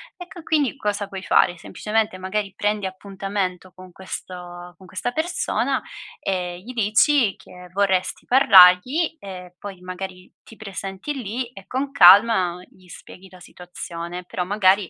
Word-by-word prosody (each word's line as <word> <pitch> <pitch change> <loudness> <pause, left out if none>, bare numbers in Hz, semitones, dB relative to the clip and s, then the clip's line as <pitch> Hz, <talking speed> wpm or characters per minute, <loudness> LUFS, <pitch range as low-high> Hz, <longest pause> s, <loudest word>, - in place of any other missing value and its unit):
Ecco, 355 -2 -11
quindi 295 -5 0
cosa 205 -4 -2
puoi 190 -1 -7
fare, 175 - +3
semplicemente, 210 +3 -2
magari, 195 +1 -3
prendi 210 -1 -1
appuntamento 190 -1 -4
con 185 -1 -14
questo 175 -1 -9
con 190 0 -16
questa 185 +7 -4
persona 320 +6 -1 0.4
e 180 -2 -3
gli 240 - -9
dici 225 +2 +3
che 180 -1 -14
vorresti 190 -2 0
parlargli 250 - +6
e 180 -4 -10
poi 195 -2 -9
magari 185 0 -8
ti 225 - -15
presenti 195 +4 -6
lì 245 -1 -5
e 195 -5 -13
con 270 +2 -3
calma 190 -3 +6
gli 185 -1 -22
spieghi 185 +2 -13
la 185 - -15
situazione, 175 0 -8
però 180 0 -4
magari 195 -1 +2
190 Hz, 140 wpm, -22 LUFS, 180-215 Hz, 0.4 s, parlargli